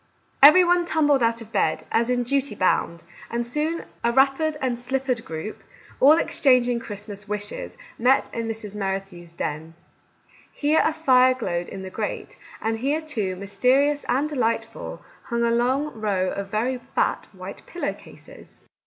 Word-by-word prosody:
Every 305 +7 +9
one 350 0 +3
tumbled 295 -5 +2
out 230 0 +1
of 225 -1 -11
bed, 155 - 0
as 235 +1 +2
in 245 -1 +1
duty 275 -1 -1
bound, 170 -3 0 0.3
and 235 0 -2
soon 305 +7 -2 0.2
a 235 - +3
wrappered 275 +4 +2
and 250 -3 -1
slippered 255 -1 -2
group, 165 +7 -6 0.4
all 295 +4 +7
exchanging 250 -6 +3
Christmas 205 -1 -8
wishes, 205 - -5 0.2
met 255 +3 +3
in 230 -1 -3
Mrs. 220 -2 -5
Merrithew's 195 -4 -4
den. 160 0 -5 0.8
Here 300 +2 +2
a - - +2
fire 260 -5 +4
glowed 175 -8 -3
in 190 - -7
the 190 - -7
grate, 210 +1 -4 0.3
and 225 0 -1
here, 280 +5 0
too, 220 -13 -3
mysterious 255 +10 +1
and 275 +4 +2
delightful, 230 -5 -3 0.2
hung 235 -1 -1
a 235 - +2
long 260 +6 +1
row 200 -4 -1
of 200 0 -4
very 245 +5 -1
fat - - -1
white - - -9
pillow 350 - -3
cases - - -16
235 Hz, 155 wpm, -24 LUFS, 205-275 Hz, 0.8 s, Every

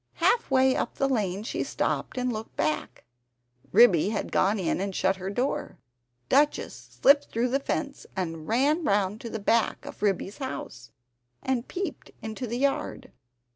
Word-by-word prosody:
Half 470 - +2
way 265 -1 +4
up - - -2
the 275 - +1
lane 205 -6 -1
she 225 - -2
stopped - - -2
and 250 -1 0
looked 220 +1 -7
back; 155 0 -2 0.7
Ribby 200 -5 +6
had 215 - -3
gone 200 +3 +2
in 185 -1 -1
and 195 -1 -3
shut 190 0 +1
her 190 +1 -4
door. 245 +7 -2 0.5
Duchess 290 +2 +1
slipped 285 +1 +6
through 235 +2 0
the 270 +3 +1
fence, 280 0 -3
and 165 -4 -4
ran 285 +9 +2
round 205 -3 +1
to 230 - -6
the 225 - -4
back 220 +2 +1
of - - -9
Ribby's 200 +1 -1
house, 125 - -6 0.5
and 260 -2 -1
peeped 380 +2 -5
into 220 +3 -4
the 235 +2 -3
yard. 275 +1 -1
225 Hz, 165 wpm, -27 LUFS, 195-265 Hz, 0.7 s, Ribby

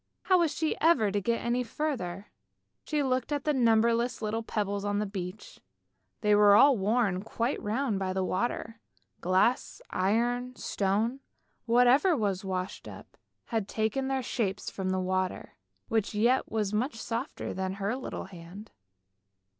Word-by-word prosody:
How 370 -1 +4
was 335 -3 +2
she 315 - -1
ever 270 -11 +4
to 205 0 0
get 235 +4 -1
any 240 +1 +1
further? 225 - -4 0.5
She 300 -1 0
looked 255 0 -1
at 290 -2 -1
the 300 - +1
numberless 235 -1 +2
little 220 +1 -2
pebbles 205 -2 -2
on 205 0 -1
the 210 - 0
beach; 185 -3 -7 0.6
they 210 0 +3
were 205 -1 +7
all 275 +5 +7
worn 205 -2 +1
quite 235 +5 -2
round 220 0 -1
by 190 -1 -1
the 190 0 -1
water. 225 +3 -2 0.4
Glass, 185 +7 +1
iron, 240 +6 0
stone, 215 +6 -1 0.5
whatever 250 +8 +5
was 200 -4 -1
washed 185 0 -4
up, - - -11 0.4
had 220 -3 0
taken 220 +6 -1
their 265 -1 -1
shapes 205 -5 -2
from 190 -1 -3
the 185 0 0
water, 185 0 -2 0.3
which 220 -2 -1
yet 240 +5 +2
was 215 -2 -1
much 235 +5 0
softer 230 +4 -4
than 190 0 -2
her 200 +4 -2
little 260 - -5
hand. 190 +3 -11
220 Hz, 155 wpm, -29 LUFS, 195-250 Hz, 0.6 s, were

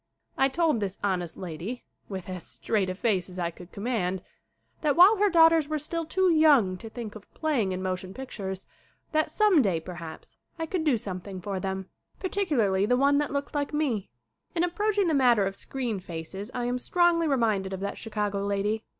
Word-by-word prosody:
I 270 - +3
told 315 -3 +2
this 200 -2 -3
honest 180 -4 -1
lady, 185 +7 -6 0.3
with 190 -3 -5
as 185 -2 -5
straight 200 -4 -1
a 185 - -3
face 195 -4 0
as 180 - -11
I 170 -1 -1
could 175 +1 -13
command, 200 -5 -2 0.6
that 295 -2 +2
while 380 +6 +8
her 415 +1 +4
daughters 325 -3 +5
were 310 - 0
still 325 +2 -3
too 375 +3 +2
young 290 - +5
to 225 - -9
think 220 -2 -7
of 215 -2 -13
play 310 -6 +1
ing 190 -3 0
in 185 0 -3
motion 185 0 -3
pictures 195 -6 -6 0.5
that 310 0 +2
some 415 -8 +4
day, 190 -8 +1
perhaps, 165 -1 -9 0.2
I 325 - -2
could 330 0 -2
do 290 -6 +3
something 190 -2 -6
for 195 +1 -3
them, 190 0 -3 0.3
particularly 255 - +1
the 250 +2 +3
one 280 +2 +4
that 295 - -1
looked 280 0 -3
like 290 0 -1
me. 255 -10 0 0.5
In 340 - +2
approaching 405 +2 +1
the 325 - +2
matter 245 -7 +4
of 195 0 -3
screen 245 -5 -3
faces 180 +4 -7
I 245 -1 -3
am 245 +1 -1
strongly 345 +3 +3
reminded 220 -8 +1
of 190 - -4
that 200 - -4
Chicago 210 -2 -2
lady. 205 +2 0
225 Hz, 195 wpm, -27 LUFS, 190-305 Hz, 0.6 s, while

